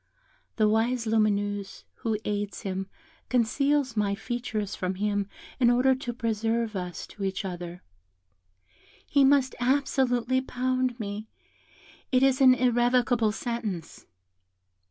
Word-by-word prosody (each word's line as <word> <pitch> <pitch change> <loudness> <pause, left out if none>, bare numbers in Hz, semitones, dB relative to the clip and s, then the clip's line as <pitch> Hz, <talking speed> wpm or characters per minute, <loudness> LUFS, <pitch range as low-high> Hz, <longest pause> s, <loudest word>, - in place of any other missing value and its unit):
The 215 -2 +3
wise 230 +3 +1
Lumineuse, 205 -2 0
who 220 -2 -1
aids 205 -1 -3
him, 190 0 -3 0.4
conceals 265 +2 +1
my 205 -2 +1
features 220 -2 -3
from 185 0 -2
him 205 0 -1 0.3
in 240 -2 +5
order 250 +2 +4
to 255 -2 -4
preserve 225 -1 -1
us 180 -3 -4
to 200 - -9
each 195 +1 -2
other: 175 -1 -6 1.2
he 280 -1 +3
must 270 -1 +4
absolutely 260 -1 +1
pound 255 -1 -1
me, 210 +1 -5 0.8
it 255 0 +4
is 270 0 +3
an 255 -1 +8
irrevocable 245 -2 +2
sentence." 220 -7 -5
230 Hz, 115 wpm, -27 LUFS, 205-255 Hz, 1.2 s, an